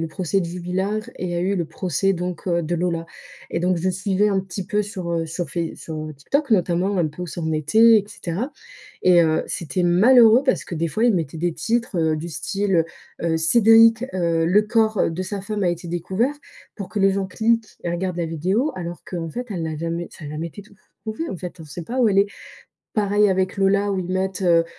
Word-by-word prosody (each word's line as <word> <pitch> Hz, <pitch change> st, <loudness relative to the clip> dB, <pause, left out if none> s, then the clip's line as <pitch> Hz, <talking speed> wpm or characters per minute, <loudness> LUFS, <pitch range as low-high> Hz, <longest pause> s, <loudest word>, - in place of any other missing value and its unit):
le 165 Hz, -, -2 dB
procès 185 Hz, +3 st, -1 dB
de -, -, -2 dB
Jubillar 180 Hz, +4 st, -2 dB, 0.2 s
et 185 Hz, -, -4 dB
il -, -, -3 dB
y -, -, -2 dB
a -, -, 0 dB
eu 190 Hz, +3 st, 0 dB
le 175 Hz, -3 st, -1 dB
procès, 185 Hz, +4 st, -1 dB
donc 180 Hz, 0 st, -4 dB
heu, 170 Hz, 0 st, +2 dB
de 170 Hz, +3 st, -2 dB
Lola. 170 Hz, -1 st, -1 dB, 0.4 s
Et 170 Hz, -, -1 dB
donc, 180 Hz, 0 st, +1 dB
je 175 Hz, +3 st, 0 dB
suivais 190 Hz, +2 st, +1 dB
un 195 Hz, -1 st, +1 dB
petit 190 Hz, 0 st, -6 dB
peu, 210 Hz, +2 st, +1 dB
sur 190 Hz, -5 st, -5 dB
heu, 165 Hz, -1 st, -1 dB
sur 165 Hz, +2 st, -4 dB
Face 170 Hz, -2 st, -3 dB
sur 155 Hz, -1 st, -6 dB
TikTok, 280 Hz, -, -1 dB
notamment, 185 Hz, 0 st, +2 dB
un 170 Hz, -, +2 dB
peu 150 Hz, +4 st, -7 dB
où -, -, -4 dB
ça 170 Hz, -, -6 dB
en 160 Hz, -1 st, -1 dB
était, 220 Hz, +9 st, +5 dB
et 200 Hz, -, -3 dB
cetera. 200 Hz, -, -4 dB, 0.5 s
Et 180 Hz, -1 st, +6 dB
heu, 160 Hz, -1 st, +1 dB
c'était 170 Hz, +2 st, -2 dB
malheureux 225 Hz, +7 st, +6 dB
parce 270 Hz, -, +1 dB
que, 175 Hz, -, -6 dB
des 165 Hz, +1 st, -1 dB
fois, 220 Hz, +8 st, 0 dB
ils 240 Hz, -3 st, +4 dB
mettaient 160 Hz, -3 st, -2 dB
des 170 Hz, 0 st, -1 dB
titres, 230 Hz, +5 st, -1 dB
heu, 160 Hz, -1 st, +2 dB
du 160 Hz, +3 st, -5 dB
style, 180 Hz, +2 st, 0 dB, 0.4 s
heu: 165 Hz, -1 st, +1 dB
Cédric, 225 Hz, +6 st, +5 dB
heu, 170 Hz, -3 st, +1 dB
le 195 Hz, +6 st, +4 dB
corps 220 Hz, -1 st, +2 dB
de 175 Hz, +3 st, -3 dB
sa 195 Hz, +2 st, -4 dB
femme 205 Hz, +1 st, -3 dB
a 180 Hz, -, +2 dB
été 175 Hz, 0 st, -3 dB
découvert. 190 Hz, -, -1 dB, 0.4 s
Pour 200 Hz, -3 st, -7 dB
que 210 Hz, -, -4 dB
les 195 Hz, 0 st, +4 dB
gens 195 Hz, 0 st, -1 dB
cliquent 225 Hz, +3 st, 0 dB
et 170 Hz, -, -1 dB
regardent 175 Hz, +1 st, -2 dB
la 170 Hz, -1 st, -1 dB
vidéo, 185 Hz, -, 0 dB
alors 175 Hz, -1 st, -6 dB
qu'en 170 Hz, -3 st, -5 dB
fait, 245 Hz, +8 st, -5 dB
elle 175 Hz, -5 st, -3 dB
n'a 160 Hz, -1 st, -3 dB
jamais 170 Hz, +2 st, -3 dB
ça 155 Hz, -, -12 dB
a -, -, -6 dB
jamais 155 Hz, +3 st, -4 dB
été 205 Hz, +5 st, -11 dB
tou 205 Hz, 0 st, -20 dB, 0.3 s
trouvé, 220 Hz, +10 st, -4 dB
en -, -, -4 dB
fait. 180 Hz, -1 st, -8 dB
On -, -, -9 dB
sait 155 Hz, +3 st, -8 dB
pas 245 Hz, +10 st, -4 dB
où 235 Hz, -, +5 dB
elle 195 Hz, -1 st, +2 dB
est. 200 Hz, -, +5 dB, 0.7 s
Pareil 205 Hz, 0 st, +3 dB
avec 190 Hz, 0 st, 0 dB
Lola, 200 Hz, +1 st, +2 dB
où 190 Hz, -, -1 dB
ils 180 Hz, -, -3 dB
mettent: 190 Hz, +1 st, -2 dB
«Heu 170 Hz, -2 st, +4 dB
185 Hz, 240 wpm, -22 LUFS, 170-205 Hz, 0.7 s, Et